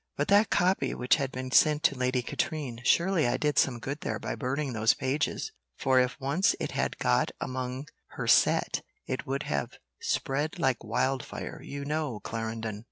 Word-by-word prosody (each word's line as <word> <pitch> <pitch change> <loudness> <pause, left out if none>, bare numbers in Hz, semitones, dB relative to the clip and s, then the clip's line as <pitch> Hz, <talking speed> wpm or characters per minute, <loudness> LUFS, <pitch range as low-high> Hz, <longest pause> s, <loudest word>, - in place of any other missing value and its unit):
"But 145 - -1
that 205 +1 +5
copy 180 -7 +2
which 125 +4 +3
had 135 -3 -2
been 130 0 -5
sent 150 +4 +5
to 140 - +4
Lady 125 -1 0
Katrine, 135 -5 -3
surely 170 0 +3
I - - +1
did 150 -2 +2
some 130 -3 +2
good 140 +6 -5
there - - -2
by - - -4
burning 140 0 -2
those 110 0 +3
pages; 135 +3 -1 0.3
for 130 -1 +3
if 125 +3 0
once 145 +8 +2
it - - -3
had - - -1
got 60 - +2
among 130 +1 -4 0.3
her - - -2
set, - - +3 0.2
it 130 - -4
would 135 +1 -1
have 70 -2 -2 0.3
spread 145 +3 -1
like 130 -3 +1
wildfire, 130 +4 -2
you 140 0 -6
know, 150 -6 -2
Clarendon." 110 -1 -4
130 Hz, 175 wpm, -29 LUFS, 125-150 Hz, 0.3 s, that